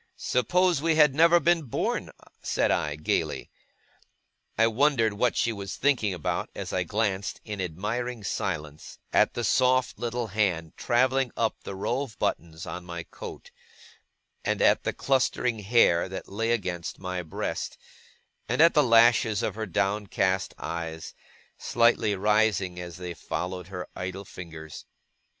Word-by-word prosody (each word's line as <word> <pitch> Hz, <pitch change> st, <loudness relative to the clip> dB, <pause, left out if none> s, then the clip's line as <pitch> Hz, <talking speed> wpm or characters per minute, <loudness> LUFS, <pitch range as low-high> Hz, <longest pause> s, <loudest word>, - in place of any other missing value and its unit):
'Suppose 175 Hz, +6 st, +2 dB
we 165 Hz, 0 st, +2 dB
had 150 Hz, -3 st, +6 dB
never 170 Hz, +3 st, +6 dB
been 170 Hz, 0 st, +3 dB
born!' 130 Hz, -7 st, -2 dB, 0.3 s
said -, -, +1 dB
I, 75 Hz, -2 st, 0 dB
gaily. 75 Hz, -, -2 dB, 1.1 s
I 115 Hz, -, +5 dB
wondered 115 Hz, -1 st, +2 dB
what 115 Hz, +4 st, +1 dB
she 115 Hz, -, +1 dB
was 100 Hz, -2 st, -6 dB
thinking 130 Hz, -8 st, +2 dB
about, 90 Hz, -5 st, -2 dB
as -, -, -5 dB
I -, -, +1 dB
glanced 100 Hz, -2 st, -1 dB
in 105 Hz, -3 st, -4 dB
admiring 110 Hz, +7 st, -3 dB
silence 75 Hz, -6 st, -4 dB, 0.2 s
at -, -, +3 dB
the -, -, -1 dB, 0.6 s
little 120 Hz, 0 st, -2 dB
soft 100 Hz, -, -14 dB
hand 90 Hz, -7 st, 0 dB
travelling 130 Hz, +1 st, +2 dB
up 115 Hz, -1 st, 0 dB
the 100 Hz, -, -7 dB
row 110 Hz, +7 st, -1 dB
of 135 Hz, -6 st, -7 dB
buttons 80 Hz, 0 st, -2 dB
on 90 Hz, -, -6 dB
my 85 Hz, -1 st, -6 dB
coat, -, -, -10 dB, 0.9 s
and -, -, 0 dB
at -, -, +3 dB
the -, -, 0 dB
clustering 125 Hz, -3 st, +1 dB
hair 95 Hz, -5 st, +3 dB
that 95 Hz, -, -6 dB
lay 115 Hz, +3 st, -2 dB
against 90 Hz, -7 st, -2 dB
my 90 Hz, -1 st, -4 dB
breast, 80 Hz, -3 st, -4 dB, 0.7 s
and 125 Hz, -, 0 dB
at 165 Hz, +2 st, +7 dB
the 150 Hz, -, +5 dB
lashes 115 Hz, -4 st, +4 dB
of -, -, -1 dB
her 110 Hz, 0 st, -4 dB
downcast 95 Hz, 0 st, 0 dB
eyes, 80 Hz, -1 st, -5 dB, 0.5 s
slightly 115 Hz, -3 st, +2 dB
rising 105 Hz, -3 st, +1 dB
as 90 Hz, 0 st, -7 dB
they 90 Hz, -1 st, -5 dB
followed 90 Hz, +2 st, -4 dB
her 90 Hz, -1 st, -6 dB
idle 95 Hz, +2 st, -5 dB
fingers. 80 Hz, -5 st, -9 dB
105 Hz, 145 wpm, -27 LUFS, 90-120 Hz, 1.1 s, at